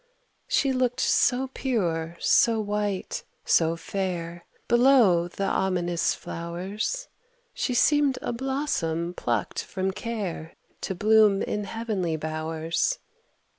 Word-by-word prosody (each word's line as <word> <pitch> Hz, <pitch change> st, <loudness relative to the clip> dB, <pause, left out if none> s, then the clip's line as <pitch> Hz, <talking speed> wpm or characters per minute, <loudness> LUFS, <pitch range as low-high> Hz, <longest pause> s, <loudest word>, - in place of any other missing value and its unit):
She 275 Hz, -1 st, +2 dB
looked 255 Hz, -1 st, 0 dB
so 260 Hz, 0 st, +2 dB
pure, 170 Hz, -10 st, -1 dB
so 230 Hz, -1 st, +4 dB
white, 205 Hz, -2 st, -2 dB, 0.2 s
so 165 Hz, 0 st, +3 dB
fair 175 Hz, -2 st, -4 dB, 0.2 s
Below 235 Hz, -8 st, +5 dB
the 195 Hz, +3 st, -4 dB
ominous 180 Hz, -3 st, 0 dB
flowers, 190 Hz, -, -4 dB, 0.5 s
She 250 Hz, -, -1 dB
seemed 290 Hz, 0 st, +3 dB
a -, -, -2 dB
blossom 230 Hz, -, -2 dB
plucked 120 Hz, -9 st, -2 dB
from 190 Hz, 0 st, -2 dB
care 200 Hz, -6 st, -5 dB, 0.3 s
To 190 Hz, -, -2 dB
bloom 210 Hz, 0 st, +4 dB
in 210 Hz, 0 st, -2 dB
heavenly 205 Hz, -7 st, -2 dB
bowers. 155 Hz, +1 st, -1 dB
195 Hz, 105 wpm, -26 LUFS, 170-235 Hz, 0.5 s, Below